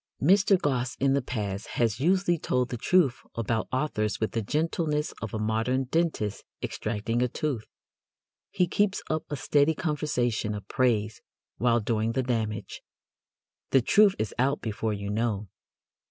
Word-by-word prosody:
Mr. 195 +4 +4
Gosse 130 -6 -1
in 135 0 +2
the 140 - +2
past 105 -5 -4
has 115 -2 +1
usually 175 +2 +2
told 125 -3 0
the 120 - -3
truth 155 -1 +2
about 115 -1 -1
authors 130 -6 -1
with 110 - -1
the 115 - -1
gentleness 150 - -1
of 110 - -4
a - - -3
modern 110 +5 0
dentist 130 -8 -1 0.2
extracting 110 +2 -2
a 125 - +3
tooth. 125 -3 -3 0.8
He 185 -3 +2
keeps 200 +2 +1
up 155 0 -1
a 145 - -2
steady 145 +3 +2
conversation 125 -10 -1
of 105 - -8
praise 110 -5 +1 0.4
while 120 +1 +2
doing 110 +1 0
the 130 - 0
damage. 110 -3 -2 0.9
The 135 -3 +4
truth 205 - +5
is 110 -3 -2
out 135 +3 +2
before 110 0 -2
you 100 0 -4
know. 105 -2 -1
125 Hz, 155 wpm, -27 LUFS, 110-150 Hz, 0.9 s, truth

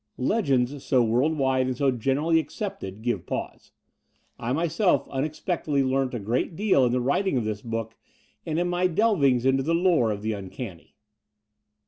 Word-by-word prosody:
Legends 135 - 0
so 130 -4 +3
world 125 +8 +1
wide 130 -2 +1
and 130 -1 -2
so 140 -1 +2
generally 135 +7 +1
accepted 160 - -6
give 105 -8 -2
pause. - - -5 0.7
I 120 - -3
myself 170 +6 +1
tmexpectedly 150 0 -1
learnt 130 -1 0
a - - -2
great 120 - -1
deal 190 -9 +3
in - - 0
the 125 - +1
writing 140 +6 +1
of 120 - -1
this 105 -1 -3
book 115 -1 -4 0.5
and 160 -1 -3
in 175 +1 +1
my 180 +1 +1
drivings 160 - +2
into 135 0 +3
the 165 +5 0
lore 170 -9 +3
of 105 -1 -3
the 110 - -1
tmcanny 95 -2 -7
135 Hz, 165 wpm, -25 LUFS, 120-165 Hz, 0.7 s, so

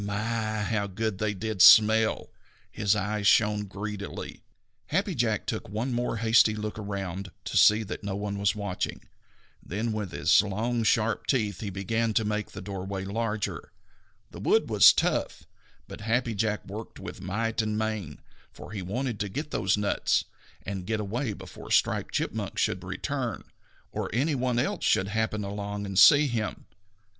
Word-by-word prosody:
My, 110 +1 -2
how 105 -1 -1
good 100 0 -3
they 105 -1 -1
did 105 0 -2
smell! 110 0 +6 0.4
His 105 0 +1
eyes 105 0 -1
shone 105 -1 +4
greedily. 100 +1 -6 0.5
Happy 195 +4 0
Jack 115 - 0
took - - -4
one 115 +5 -2
more 120 -1 -1
hasty 110 -1 +4
look 105 0 -5
around 100 -2 -5 0.2
to - - -5
see 105 +1 +6
that 105 - -7
no 100 -1 -3
one 100 0 -3
was 100 0 +1
watching, 100 -3 -4 0.6
then 110 +5 -3
with 105 -4 -3
his - - +4
long 110 +4 -2
sharp 110 0 +1
teeth 105 -8 0
he 105 - -4
began 110 +3 -1
to 110 - +2
make 105 0 -2
the - - -9
doorway 95 0 -5
larger. 105 +1 -3 0.6
The - - -10
wood - - +2
was - - +9
tough, - - -1 0.4
but - - -9
Happy 115 +2 0
Jack 105 +1 -1
worked 105 +3 -8
with - - -8
might 115 +5 -1
and 110 -1 -2
main, 110 -9 -3 0.3
for - - -11
he 105 -3 -4
wanted 115 +4 -3
to 105 - -2
get 150 +10 -5
those 95 +2 +1
nuts 105 -1 +1 0.4
and 95 0 -5
get 110 -1 -1
away 110 +3 -2
before - - -11
Striped - - +1
Chipmunk - - -3
should - - 0
return, - - -3 0.5
or - - -3
any 140 +7 +1
one 125 -2 0
else 120 - -1
should 95 +1 +2
happen 110 0 -1
along 100 0 -4
and 95 -1 0
see 150 0 +8
him. 115 -6 -3
105 Hz, 165 wpm, -27 LUFS, 100-115 Hz, 0.6 s, was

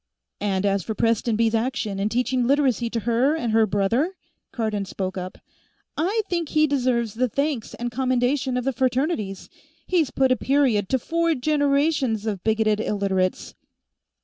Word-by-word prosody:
"And 200 -1 -1
as 200 -1 +1
for 220 +5 -5
Prestonby's 230 0 +1
action 225 -4 -1
in 205 +2 0
teaching 250 +1 0
Literacy 265 -4 +2
to 230 0 -3
her 240 +7 +2
and 240 -8 -2
to 225 - +4
her 220 - +4
brother," 225 - 0 0.4
Cardon 215 -4 -2
spoke 190 0 -4
up, 185 0 -6 0.6
"I 400 +8 0
think 340 -4 -2
he 310 -1 +3
deserves 250 -6 0
the 255 +2 0
thanks 280 -1 -2
and 240 0 -4
commendation 255 +1 0
of 250 - -1
the 270 +1 -1
Fraternities. 250 - -1 0.4
He's 330 -7 +1
put 265 -1 +1
a - - +5
period 255 -8 +1
to 265 - +2
four 335 +5 0
generations 280 -4 +1
of 205 -4 -3
bigoted 220 -1 +1
Illiterates." 195 -3 -1
240 Hz, 160 wpm, -23 LUFS, 215-275 Hz, 0.6 s, a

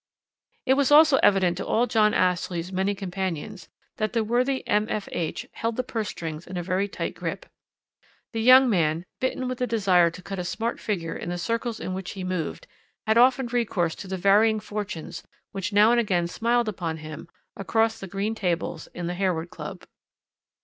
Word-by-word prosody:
"It 260 - +4
was 275 -1 +2
also 300 -2 +7
evident 185 -6 +3
to 195 - -4
all 235 +2 +2
John 215 -3 +3
Ashley's 180 -1 0
many 190 +2 0
companions 190 -1 -5 0.3
that 215 +1 -1
the 230 -2 +1
worthy 250 +4 0
M.F.H. 210 -5 -1
held 230 0 -3
the 255 - -1
purse 225 -4 -3
strings 160 -1 -6
in 180 0 -6
a 175 - -2
very 185 +3 0
tight - - -4
grip. - - -5 0.9
The 225 - -1
young 255 +3 +8
man, 165 -5 +1
bitten 260 0 -1
with 255 -1 -4
the 250 - 0
desire 190 -7 +3
to 170 +2 -11
cut 195 0 -5
a - - -2
smart 225 +6 -3
figure 175 -7 -3
in - - -5
the 175 - -2
circles 230 +4 -2
in 185 - -4
which 190 0 -5
he 190 -2 -6
moved, 185 - -3 0.4
had 220 +1 +4
often 260 +1 +5
recourse 225 -9 0
to 195 - -8
the 190 0 -3
varying 210 +4 +4
fortunes 205 -5 -6 0.3
which 195 +1 -4
now 210 +2 +6
and 240 - +4
again 185 -7 +1
smiled 235 +6 0
upon 175 -6 -3
him 155 +1 -9 0.3
across 225 +4 0
the 195 - -7
green 200 +4 -2
tables 175 -6 -2
in 175 - -4
the 175 - -2
Harewood 180 -3 -1
Club. - - -8
200 Hz, 185 wpm, -25 LUFS, 180-230 Hz, 0.9 s, young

